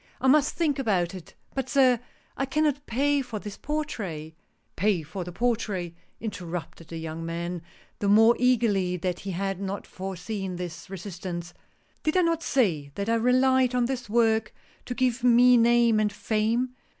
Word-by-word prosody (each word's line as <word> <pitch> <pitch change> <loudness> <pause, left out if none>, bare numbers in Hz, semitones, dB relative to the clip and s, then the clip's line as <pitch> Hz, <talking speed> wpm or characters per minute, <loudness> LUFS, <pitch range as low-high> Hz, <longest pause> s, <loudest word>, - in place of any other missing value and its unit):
"I - - -4
must 290 +2 +4
think 300 -5 0
about 190 -9 +1
it 185 -3 -10
— - - -36
but, 265 -1 -3
sir 260 -4 +4 0.2
— - - -36
I 270 - -1
cannot 290 0 0
pay 280 +4 +2
for 245 -4 -5
this 205 -1 -7
portrait 205 - -4 0.2
" - - -44
" - - -45
Pay 190 -2 +1
for 170 +5 -6
the 175 - -7
portrait," 200 -5 -1 0.3
interrupted 175 -6 -6
the 165 - -7
young 160 0 -5
man, 170 +1 -4 0.4
the 205 - -1
more 225 +3 +6
eagerly 215 -8 +2
that 180 0 -2
he 200 - -6
had 195 +1 -2
not 195 +1 -4
foreseen 190 +1 -5
this 175 +1 -7
resist 190 -1 -7
ance. 175 -1 -5 0.3
" - - -38
Did 310 +4 +1
I 365 - +5
not 335 -1 +1
say 180 - +1
that 200 +2 -3
I - - +3
relied 255 +2 +3
on 245 -1 +3
this 250 -2 -4
work 225 -1 +2 0.3
to 245 - -4
give 255 -1 0
me 245 0 +6
name 235 -1 +4
and 210 -1 +1
fame 220 +4 0
215 Hz, 185 wpm, -26 LUFS, 180-250 Hz, 0.4 s, more